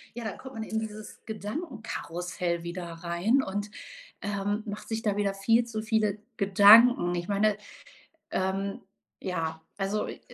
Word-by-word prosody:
ja, 240 -1 -5
dann 220 - -4
kommt 265 0 -10
man 220 - -3
in 220 0 -2
dieses 215 -1 -7
Gedankenkarussell 205 - -4
wieder 175 +1 -5
rein 170 +9 +1
und, 205 +2 -4 0.5
ähm, 205 +1 -1
macht 205 0 -6
sich 225 0 -2
da 205 -2 +1
wieder 200 -1 +1
viel 225 +4 +3
zu 220 -2 -4
viele 215 -2 +1 0.2
Gedanken. 200 -1 +7
Ich 175 0 -3
meine, 205 +1 +2 0.7
ähm 195 +1 -1 0.4
ja, 165 -3 -3 0.2
also 200 +2 -1
i - - -8
205 Hz, 145 wpm, -28 LUFS, 190-220 Hz, 0.7 s, Gedanken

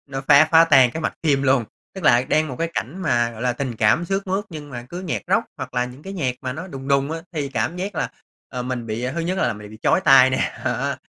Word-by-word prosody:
nó 135 -1 -5
phá 155 +2 +7
phá 165 0 +7
tan 130 -7 +5
cái 160 - -5
mạch - - -2
phim 140 -4 +2
luôn. 130 -3 +3 0.3
Tức 190 -4 -8
là 120 -3 +5
đang 155 0 +2
một 130 - -6
cái 165 0 -1
cảnh 175 +11 -4
mà, 120 -6 +1
gọi 115 0 -9
là, 125 -1 +1
tình 125 -2 -4
cảm 110 +11 +3
sướt 195 +3 -2
mướt, 190 +2 -1
nhưng 150 -3 -8
mà 120 -2 -7
cứ 175 +5 -6
nhạc 155 - -3
Rock - - +2
hoặc - - -7
là 125 0 +1
những 125 +4 -10
cái 195 - -7
nhạc 130 -9 -1
mà 130 -1 -4
nó 160 +6 -7
đùng 135 -6 -8
đùng 140 +1 +2
á, 165 - -3
thì 150 -4 -3
cảm 130 +6 -2
giác 195 +3 -4
là, - - -2 0.4
ờ, 125 -1 -5
mình 125 -2 -4
bị 115 +3 -3
thứ 170 - -2
nhất 180 +3 -2
là - - +1
mình 105 0 -10
bị 110 - -12
chói - - +3
tai 135 -7 +6
nè 130 - 0
ha. - - -2
135 Hz, 280 wpm, -22 LUFS, 125-165 Hz, 0.4 s, phá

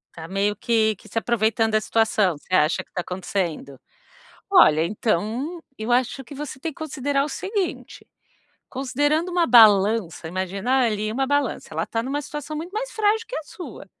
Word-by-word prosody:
Tá 160 -1 -8
meio 200 +3 0
que 220 0 +1
que - - -17
se - - -6
aproveitando 225 -1 +1
da 215 0 +2
situação. 215 -7 +1
Você 185 - -11
acha 155 -2 +3
que - - -37
tá 180 - -2
acontecendo? 175 -6 -4 0.7
Olha, 160 - +6
então, 225 - -2 0.2
eu 220 +3 -2
acho 255 +2 +1
que 285 - -11
você 280 -2 -6
tem 315 +3 -4
que - - -19
considerar 280 -2 -1
o - - -4
seguinte, 385 +4 -4 0.6
considerando 290 +6 0
uma 350 -1 +2
balança 210 - +5
imagina 195 +9 0
ali 215 -1 -1
é 215 - -3
uma 270 +3 0
balança, 285 +1 -1
ela - - -2
tá 225 - -2
numa 275 +4 -2
situação 295 +1 -6
muito 340 +5 -6
mais - - -3
frágil 440 +1 +1
que - - -6
a 315 - -3
sua, 290 - -10
235 Hz, 180 wpm, -23 LUFS, 205-295 Hz, 0.7 s, Olha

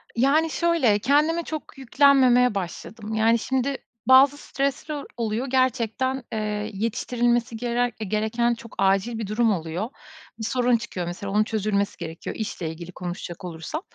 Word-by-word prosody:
Yani, 280 +7 +3
şöyle, 320 -11 +2
kendime 300 +8 +2
çok 310 -3 -7
yüklenmemeye 260 -3 +4
başladım. 205 +4 -5
Yani, 225 +1 +3
şimdi, 265 +3 -1 0.3
bazı 265 +2 +7
stresler 280 +1 -3
oluyor 230 +2 -1
gerçekten, 260 0 0
eee, 210 -1 -2
yetiştirilmesi 235 +2 0
gerer 240 +1 0
eee, 215 - -4
gereken 220 +4 +1
çok 230 -1 -11
acil 195 +4 +2
bir 220 -2 -4
durum 220 +2 +2
oluyor. 175 +4 -3 0.5
Bir - - -5
sorun 245 +1 +2
çıkıyor 185 -6 -5
mesela 190 +3 -5
onun 210 +1 +3
çözülmesi 210 -2 -1
gerekiyor, 165 -1 -6
işle 205 -6 -4
ilgili 170 +2 -8
konuşacak 175 0 -6
olursam. 170 - -5
230 Hz, 140 wpm, -24 LUFS, 205-260 Hz, 0.5 s, bazı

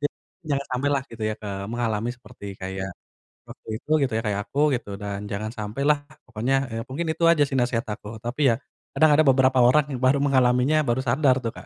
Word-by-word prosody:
Jadi 145 - 0 0.4
jangan 140 -1 -1
sampailah 140 +1 0
gitu 115 -1 -9
ya, 110 - -2
eee, 100 -2 -5
mengalami 115 -1 -1
seperti 110 -4 -13
kayak, 95 0 -4 0.6
waktu - - -14
itu - - -26 0.2
gitu 125 - -9
ya 115 - 0
kayak 105 -1 0
aku 140 - -3 0.2
gitu, 120 -4 -6
dan 100 0 -5
jangan 105 +2 -3
sampailah 135 +8 +1 0.3
pokoknya, 125 +3 0 0.2
eee, 115 0 -3
mungkin 160 +6 -3
itu 170 - -5
aja 150 -3 +4
sih 135 - -2
nasehat 120 -1 0
aku 105 +1 -9
tapi 130 +5 +1
ya, - - 0 0.4
kadang 155 -1 +5
ada 155 - +6
beberapa 130 -1 +4
orang 130 +5 +5
yang 130 - -4
baru 130 +2 +3
mengalaminya, 130 +1 +3
baru 120 +2 +1
sadar 130 +2 +3
tuh 115 - -2
Kak. - - -11
125 Hz, 205 wpm, -24 LUFS, 110-140 Hz, 0.6 s, ada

